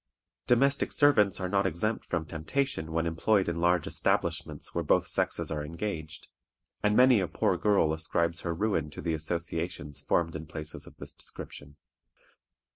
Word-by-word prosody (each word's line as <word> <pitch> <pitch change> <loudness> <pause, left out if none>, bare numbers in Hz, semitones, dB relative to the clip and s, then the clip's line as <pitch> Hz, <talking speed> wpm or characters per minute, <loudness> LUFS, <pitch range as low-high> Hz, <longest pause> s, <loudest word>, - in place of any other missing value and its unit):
Domestic 135 +3 +3
servants 110 -10 +4
are 95 - -1
not 100 +1 +2
exempt 110 +6 -1
from 85 -3 -2
temptation 80 - -2
when 80 +1 0
employed 95 +5 +2
in 85 0 -2
large 90 -1 +3
establishments - - -1
where - - -1
both - - +3
sexes - - +1
are 75 -1 -2
engaged, 80 0 -5 0.5
and 105 0 +2
many 125 -2 +7
a 95 - 0
poor - - +1
girl 100 -7 +3
ascribes 85 +1 -1
her 85 - -2
ruin 90 -5 0
to 75 - -11
the 85 - -1
associations 80 -2 -3
formed 85 +2 0
in 80 0 -6
places 75 0 -5
of - - -14
this - - -9
description. 70 0 -9
85 Hz, 160 wpm, -29 LUFS, 80-105 Hz, 0.5 s, many